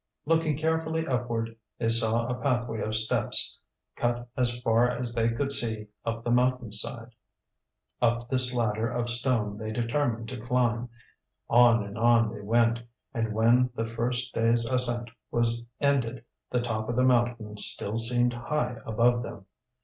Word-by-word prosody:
Looking 160 -1 +1
carefully 160 +1 -1
upward, 120 -4 -2 0.2
they 115 - -1
saw 115 0 +2
a 125 - -2
pathway 120 -5 -1
of 110 +1 -2
steps 110 0 +2 0.4
cut 120 0 -2
as 120 -1 0
far 115 +1 +3
as 125 -1 -3
they 115 -1 +1
could 135 +4 -2
see 110 -5 +2
up 115 0 -3
the 120 - -1
mountain 125 -1 +1
side. 115 +3 -2 0.9
Up 120 0 +1
this 130 -1 +5
ladder 115 -2 0
of 120 0 -2
stone 120 -4 -1
they 110 0 -5
determined 115 0 -1
to - - -7
climb. 120 0 0 0.6
On 120 -2 +5
and 100 +1 -8
on 115 -1 +3
they 105 - -8
went, 115 +2 +2 0.3
and 115 -3 -2
when 120 +4 +3
the 115 - -2
first 120 +2 -2
day's 115 +1 +2
ascent 120 -1 0 0.2
was 120 0 0
ended 130 -4 0 0.2
the 125 - 0
top 110 -2 -3
of 120 - -1
the 125 - +2
mountain 120 -4 +1
still 105 0 -1
seemed 120 +1 +2
high 120 0 -2
above 120 +2 +2
them. 100 -4 -8
120 Hz, 155 wpm, -27 LUFS, 115-125 Hz, 0.9 s, this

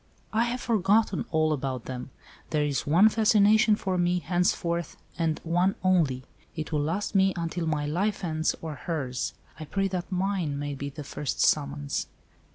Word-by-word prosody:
"I 225 +2 +3
have 245 +1 -3
forgotten 210 -2 +2
all 155 -1 +2
about 130 -4 -3
them. 125 0 -6 0.4
There 150 -1 +1
is 145 -1 -2
one 175 +8 +6
fascination 215 0 +4
for 190 -3 -2
me, 175 0 +2
henceforth, 170 0 0 0.2
and 165 -2 0
one 175 +4 +2
only. 160 -9 +2 0.3
It 155 -1 -5
will 150 -2 +1
last 170 +9 -2
me 195 -1 +4
until 165 0 -3
my 150 -2 0
life 190 +8 -1
ends 160 -2 0
or 160 -2 -4
hers. 140 -5 -3 0.2
I 155 - -6
pray 195 +6 0
that 180 0 -4
mine 185 -5 -1
may 145 0 -3
be 140 +1 -5
the 145 +2 -8
first 145 0 -4
summons." 145 -1 +1
170 Hz, 165 wpm, -27 LUFS, 145-195 Hz, 0.4 s, one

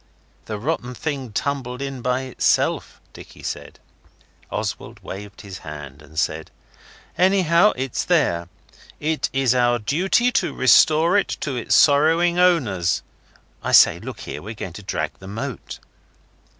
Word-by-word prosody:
'The 110 - -4
rotten 125 0 -3
thing 135 -4 -4
tumbled 130 0 -3
in 135 -2 -5
by 125 +1 0
itself,' 130 -2 0
Dicky - - -13
said. - - -6 0.7
Oswald - - -4
waved 100 +1 -8
his 95 -5 -9
hand 75 -2 -9
and 75 +1 -16
said, 80 0 -1 0.7
'Anyhow, 185 0 +4
it's 130 -1 -2
there. 125 - +1 0.5
It's 155 +1 -1 0.2
our 120 -1 +3
duty 185 - +1
to 175 - 0
restore 155 - +5
it - - -1
to 140 -3 -3
its 120 - +1
sorrowing 165 +4 +4
owners. 115 - +2 0.6
I - - -3
say, - - +7
look - - -8
here - - -6
we're 110 +4 -8
going 95 -4 -7
to 105 - -9
drag 95 - -3
the 95 - -11
moat. 115 +6 -6
130 Hz, 135 wpm, -22 LUFS, 105-160 Hz, 0.7 s, say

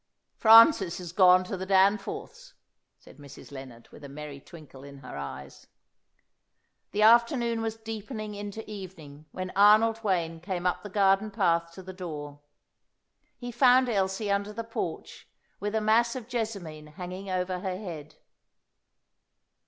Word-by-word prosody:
"Francis 225 - +6
is 175 -2 -8
gone 185 0 +5
to 185 - -5
the 190 0 -6
Danforths'," 210 - 0 0.4
said - - -18
Mrs. 140 0 -13
Lennard, 130 -4 -11
with - - -15
a 140 - -9
merry 145 0 -9
twinkle 145 -3 -14
in 140 0 -12
her - - -8
eyes. 70 -1 -9 1.2
The 210 - 0
afternoon 235 +1 +4
was 225 0 -3
deepening 220 0 -7
into 205 +2 -7
evening 170 -8 -10
when 185 0 -6
Arnold 215 +3 +5
Wayne 170 -5 -1
came 180 0 -5
up 180 - 0
the 205 - -9
garden 195 +1 +2
path 170 -5 0
to 190 - -11
the 185 +1 -9
door. 150 -6 -8 1.0
He 245 -1 -7
found 255 +1 +4
Elsie 200 0 -1
under 200 +1 -1
the 230 +2 -5
porch, 225 0 -6 0.3
with 205 +1 -3
a 220 - +1
mass 230 +3 +2
of 245 -3 -7
jessamine 200 -11 -5
hanging 185 +2 -7
over 185 0 -2
her 185 0 -4
head. 170 -7 -9
195 Hz, 145 wpm, -27 LUFS, 170-220 Hz, 1.2 s, Francis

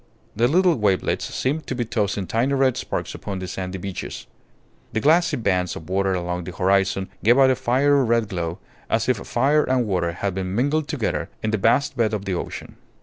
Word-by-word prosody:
The 115 +3 +3
little 175 +3 +3
wavelets 100 -3 +1
seemed 150 +4 -2
to 130 - -3
be 120 -1 -1
tossing 105 -3 -1
tiny 125 +8 0
red 135 -2 +3
sparks - - -4
upon 100 -2 -5
the 95 0 -5
sandy 95 +1 -5
beaches. 95 0 -6 0.7
The 110 - +1
glassy 160 +3 +3
bands 90 -6 0
of 80 +3 -9
water 95 0 +1
along 90 0 -3
the 90 - -5
horizon 95 +1 +1 0.2
gave 120 +4 +5
out 135 -1 +6
a - - +2
fiery 135 +3 +3
red 115 -2 +2
glow, 85 -3 -3 0.3
as 115 0 +1
if 130 -3 +2
fire 140 +9 +2
and 130 -2 +1
water 90 -4 0
had 95 +2 -2
been 95 0 -3
mingled 145 +5 +1
together 140 -9 -2
in 110 - 0
the 110 - 0
vast 140 +7 +2
bed 110 -3 +1
of 100 -1 -5
the 95 - -1
ocean. 90 - -6
110 Hz, 205 wpm, -23 LUFS, 95-130 Hz, 0.7 s, out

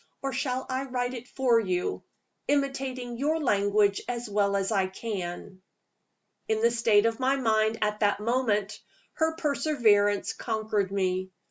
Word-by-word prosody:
Or 270 -1 -2
shall 260 0 -2
I 260 +1 -2
write 250 -1 -2
it 245 -1 -8
for 250 -4 +2
you, 185 -4 -2 0.5
imitating 270 -4 -1
your 310 +4 +1
language 205 -5 +2
as 240 -1 -3
well 200 -1 +1
as 195 +1 0
I 195 -3 +2
can?" 190 -2 -6 0.9
In 220 0 0
the 235 - +5
state 225 -2 +3
of 230 +1 0
my 265 +1 +2
mind 220 -3 +1
at 210 0 -1
that 205 -1 +2
moment, 215 -3 0 0.3
her 320 -1 0
perseverance 235 -10 +2
conquered 215 -4 -2
me. 185 -1 -1
225 Hz, 145 wpm, -27 LUFS, 205-260 Hz, 0.9 s, the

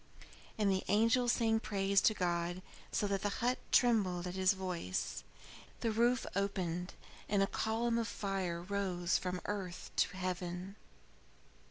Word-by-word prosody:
And 205 -2 +3
the 190 0 0
angel 230 +4 +3
sang 225 -2 +3
praise 195 -2 +2
to 215 - +4
God, 175 0 -1 0.3
so - - +1
that 200 -1 0
the 205 - 0
hut 245 +2 +1
trembled 195 -8 +3
at 180 - -4
his 190 +1 +3
voice. 180 - -3 0.6
The 230 - +1
roof 235 +2 +2
opened, 185 -2 -1 0.3
and 200 -1 +3
a - - +4
column 230 +3 0
of 230 - -1
fire 190 -5 -2
rose 185 -3 0
from 180 -1 -3
earth 190 -4 -4
to - - +2
heaven. 180 +1 -3
195 Hz, 145 wpm, -35 LUFS, 180-220 Hz, 0.6 s, to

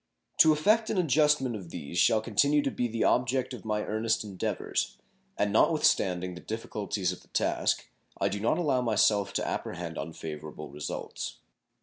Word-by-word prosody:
To 160 - +8
effect 215 +9 +3
an - - -1
adjustment 150 -6 +3
of 95 -5 -8
these 75 0 -7
shall 110 +3 +4
continue 140 +7 +2
to 135 - 0
be 125 - -1
the 115 0 -1
object 125 +1 +1
of 125 - -8
my 105 -1 -1
earnest 110 +1 0
endeavors, 100 -4 -3 0.4
and 105 0 +1
not 110 - +5
with 155 - -1
standing 90 -1 +2
the 90 - -9
difficulties 105 -4 -3
of 90 - -8
the - - -22
task, - - 0 0.3
I - - +2
do 100 - -2
not 115 +9 +1
allow 145 -7 +1
myself 105 -3 +2
to - - -1
apprehend 85 -1 -4
unfavorable 80 -2 -7
results. 75 - -5
110 Hz, 175 wpm, -29 LUFS, 95-135 Hz, 0.4 s, To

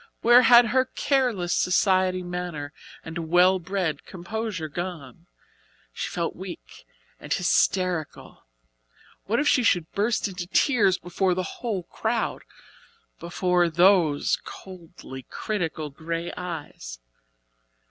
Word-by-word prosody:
Where 240 +1 +7
had 240 0 +7
her 260 +3 +3
careless 250 -9 0
society 185 0 +2
manner 175 -5 -5 0.3
and 160 0 -6
well 180 +2 +5
bred 180 -5 -3
composure 190 -1 -5
gone? 165 -1 -7 0.7
She - - -4
felt - - -3
weak - - -10 0.3
and - - -11
hysterical. 180 - 0 0.8
What 230 +4 0
if 295 - +1
she 255 - +4
should 175 -8 +1
burst 215 +2 0
into 180 -2 -6
tears 200 -4 +3
before 180 +1 -1
the 185 - -1 0.2
whole 215 -7 -2
crowd 225 +6 -2 0.8
before 175 +1 +1
those 170 -3 +3
coldly 170 -7 -11
critical 165 -7 -3
grey 165 +4 -5
eyes? 155 - -7
180 Hz, 110 wpm, -25 LUFS, 165-200 Hz, 0.8 s, Where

